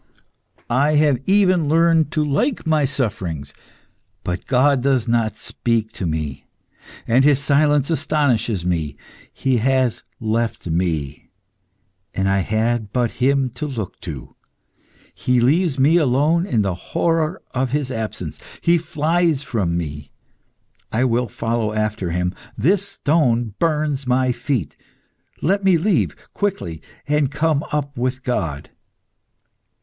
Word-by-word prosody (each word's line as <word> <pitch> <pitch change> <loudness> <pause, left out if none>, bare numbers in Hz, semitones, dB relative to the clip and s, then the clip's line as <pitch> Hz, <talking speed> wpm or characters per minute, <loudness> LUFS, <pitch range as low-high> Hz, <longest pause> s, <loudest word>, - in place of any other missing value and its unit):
I 140 +5 +2
have 145 -4 +3
even 185 -6 +3
learned 165 -1 +4
to 155 -1 +1
like 180 - 0
my 155 -2 +2
sufferings. 95 - -3 0.7
But 90 +1 -4
God 135 +1 +3
does 130 -3 +1
not 115 -2 +1
speak 115 -2 -1
to 95 -6 -4
me, 75 -4 -4 0.6
and 125 +3 +4
His 145 -1 +5
silence 145 +1 +2
astonishes 125 - +1
me. 80 -5 -1 0.3
He 130 -2 0
has 130 0 +1 0.2
left 115 +1 -1
me 80 -4 -2 0.9
and 95 0 0
I 95 0 +2
had 110 +2 0
but 120 -1 0
Him 135 0 +2
to 150 - -5
look 110 -9 -5
to. 75 -8 -8 0.8
He 125 -1 +1
leaves 150 +4 +2
me 145 +6 +4
alone 155 +4 +2
in 115 - +1
the 95 -2 0
horror 165 - -1
of 130 0 -1
His 140 0 -1
absence. 110 -3 -4 0.2
He 170 0 +3
flies 160 -1 0
from 100 -10 -1
me. 75 -4 -5 0.8
I 115 +3 +1
will 120 0 +1
follow 115 0 -2
after 110 -4 -1
Him. 90 +2 -1 0.2
This 195 +6 +2
stone 120 - +1
burns 150 -4 0
my 130 0 +2
feet. 125 - -2 0.7
Let 195 +4 +2
me 190 -3 +5
leave 185 +2 +1 0.2
quickly, 135 - -2 0.3
and 150 -2 +2
come 150 0 +1
up 145 -1 -2
with 130 +2 -2
God." 80 - -3
130 Hz, 130 wpm, -21 LUFS, 110-150 Hz, 0.9 s, His